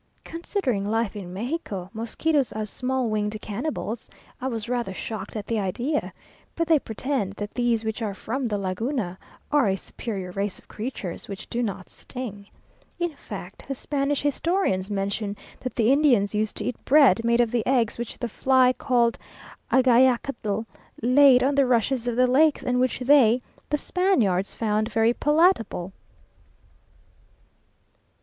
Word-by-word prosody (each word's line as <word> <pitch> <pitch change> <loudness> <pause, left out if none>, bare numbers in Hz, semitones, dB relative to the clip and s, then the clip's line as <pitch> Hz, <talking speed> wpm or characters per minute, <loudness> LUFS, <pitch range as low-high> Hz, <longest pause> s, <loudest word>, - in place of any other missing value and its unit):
Considering 330 - -2
Life 225 -1 0
in 190 -4 -7
Mexico, 200 - -4
mosquitoes 260 +5 0
as 215 -1 -4
small 255 -1 -1
winged 210 0 -1
cannibals, 230 0 -4 0.3
I 260 - -1
was 230 -4 -3
rather 240 -6 -2
shocked 210 0 -6
at 210 -2 -4
the 230 -2 -1
idea, 245 - -1 0.4
but 335 -1 0
they 320 -3 +5
pretend 225 -3 -2
that 205 0 -6
these 240 -2 +1
which 220 +1 -3
are 205 -3 -2
from 250 +6 -3
the 210 -2 -1
Laguna, 195 0 -2 0.3
are 295 -6 +4
a 190 - +2
superior 195 -2 -6
race 200 +1 -2
of - - -17
creatures, 210 -6 -6
which 195 -1 -7
do 240 - -1
not 200 -5 -3
sting. 205 -6 -8 0.5
In 345 -3 -2
fact - - -9
the 275 - -3
Spanish 280 +1 -1
historians 290 - 0
mention 200 +1 -2 0.2
that 255 - -5
the 230 +1 +3
Indians 250 -9 +3
used 215 0 -1
to - - -3
eat 250 - -4
bread 260 -7 +5
made 235 +1 +2
of 235 -2 +3
the 235 -3 +1
eggs 240 -4 +1
which 235 - -5
the 240 - -3
fly 255 +2 +3
called 240 -3 +1 0.5
agayacatl 245 -4 +3 0.4
laid 255 0 +6
on 275 +2 +2
the 275 -2 +3
rushes 245 0 +1
of 240 - 0
the 250 +1 +4
lakes, 285 +4 +3
and 250 0 +1
which 255 -1 +1
they 250 -3 +5 0.3
(the 295 - +1
Spaniards) 245 - +1
found 215 0 0
very 225 +1 +3
palatable. 295 - +2
235 Hz, 155 wpm, -25 LUFS, 210-265 Hz, 0.5 s, laid